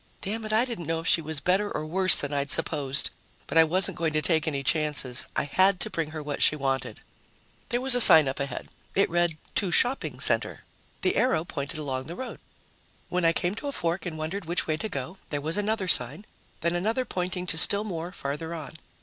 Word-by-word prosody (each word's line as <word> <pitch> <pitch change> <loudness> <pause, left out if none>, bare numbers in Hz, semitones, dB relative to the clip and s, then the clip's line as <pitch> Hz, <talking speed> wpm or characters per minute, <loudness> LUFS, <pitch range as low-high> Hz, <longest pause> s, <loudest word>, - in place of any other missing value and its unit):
Damn 220 +3 -4
it, 215 - -4
I 220 +3 +2
didn't 225 - -7
know 165 0 -1
if 165 - -9
she 165 - +3
was 155 -1 -4
better 190 +7 0
or 155 - -4
worse 185 +4 +3
than 145 0 -3
I'd 140 0 -2
supposed, 140 0 -1 0.3
but - - -7
I 165 - +7
wasn't 180 +3 0
going 160 -2 -1
to 155 - 0
take 160 -2 +1
any 140 -3 -3
chances. 145 -5 0
I - - 0
had 185 +6 +2
to - - -5
bring 165 -2 -3
her 155 -1 -7
what 145 -1 -5
she - - +4
wanted. 135 -2 -3 0.7
There 240 0 +1
was 265 0 +3
a 245 - +6
sign 155 -9 +9
up 135 - -4
ahead. 140 -3 -5 0.3
It 195 - +1
read: 175 -2 0 0.2
TO 195 - +1
SHOPPING 250 +9 0
CENTER. - - +1 0.4
The 370 - +1
arrow 245 -11 +1
pointed 140 -3 -6
along 135 -3 -4
the 165 +4 -8
road. 260 - -8 0.7
When 180 -1 -1
I 165 - +5
came 175 +2 -2
to 255 +7 -7
a - - -3
fork 175 -5 -3
and 160 -2 -6
wondered 165 +5 -5
which 170 +2 -2
way 155 - -1
to 190 +8 -5
go, 140 +3 -6
there 145 - -3
was 155 +4 -3
another 205 -1 -2
sign, 150 - +6 0.4
then 170 +1 0
another 220 +8 -1
pointing 180 -3 -4
to 165 -2 +1
still 200 +4 +7
more 175 -4 -6
farther 160 +1 -6
on. 155 -3 -9
165 Hz, 225 wpm, -26 LUFS, 150-190 Hz, 0.7 s, sign